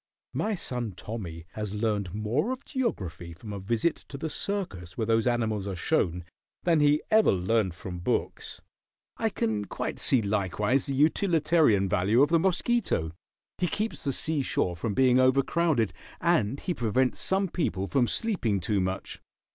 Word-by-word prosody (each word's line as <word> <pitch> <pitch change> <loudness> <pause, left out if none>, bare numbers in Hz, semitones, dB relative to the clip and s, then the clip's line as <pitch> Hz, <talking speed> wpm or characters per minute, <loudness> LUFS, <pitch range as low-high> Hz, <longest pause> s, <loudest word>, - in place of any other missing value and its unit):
My 215 0 0
son 125 - -3
Tommy 90 -5 -7
has 105 -1 -5
learned 105 -4 -1
more 115 - 0
of 260 +1 -5
geography 95 - -3
from 105 +5 -9
a 100 - -4
visit 115 - 0
to 140 - -6
the 160 +2 -4
circus 100 - -4
where 110 - 0
those 115 +1 +2
animals 110 -4 0
are 95 - -3
shown 85 0 0 0.4
than 170 -3 +3
he 150 +1 +4
ever 220 0 +6
learned 95 0 +1
from 90 0 -7
books. 85 - -2 0.5
I 225 - +1
can 110 - -1
quite - - -4
see 125 -4 +3
likewise 105 +6 0
the 135 - -2
utilitarian 155 - +3
value 105 +6 +3
of 145 - +3
the 165 0 +4
mosquito. 190 - +1 0.5
He 180 - +2
keeps 215 +5 -2
the 140 - 0
sea 155 +3 -1
shore 90 -8 0
from 100 +4 -3
being 130 -1 +5
overcrowded, 135 - +2 0.3
and 140 -8 +2
he 180 - -2
prevents 125 0 +1
some 195 +1 +1
people 95 - -1
from 125 +3 +2
sleeping 150 - 0
too 100 +3 0
much. 95 +1 -3
115 Hz, 165 wpm, -28 LUFS, 100-160 Hz, 0.5 s, ever